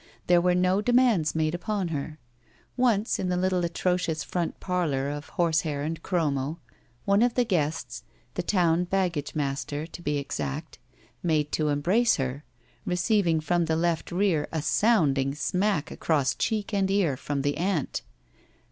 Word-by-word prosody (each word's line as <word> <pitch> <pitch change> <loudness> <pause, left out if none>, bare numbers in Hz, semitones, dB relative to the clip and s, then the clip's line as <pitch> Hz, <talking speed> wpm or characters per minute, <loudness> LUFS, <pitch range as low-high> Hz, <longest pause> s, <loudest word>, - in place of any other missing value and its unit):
There 175 -1 +4
were 180 0 +3
no 185 +2 +2
demands 240 -10 +3
made 155 0 +1
upon 190 +1 -2
her. 150 0 -4 0.6
Once, 230 -4 +2
in 185 - -1
the 180 - 0
little 185 -1 +1
atrocious 170 -2 0
front 175 -2 -3
parlor 155 -7 -1
of 145 0 -7
horse 165 -2 +1
hair 145 -3 -3
and 160 +2 -3
chromo, 155 -3 -1 0.5
one 200 +1 +3
of 240 0 +2
the 245 - +3
guests, 160 -7 -1 0.3
the - - -2
town 175 -3 +2
bag 185 -1 0
gage 145 -1 -5
master, 145 +1 -2
to 170 +1 -10
be 145 -3 -1
exact, 140 +2 -4 0.4
made 155 -3 +1
to 155 - 0
embrace 180 +12 +3
her, 135 +2 -3 0.4
receiving 180 -2 +2
from 170 +2 +1
the 160 0 0
left 165 0 0
rear 175 -5 +1
a 160 -3 -2
sounding 145 - +2
smack 180 +1 0
across 145 -5 +1
cheek 215 -1 -2
and 195 -1 +1
ear 195 -8 +2
from 140 +1 -3
the 145 0 0
aunt. 175 -3 -1
170 Hz, 160 wpm, -27 LUFS, 150-185 Hz, 0.6 s, There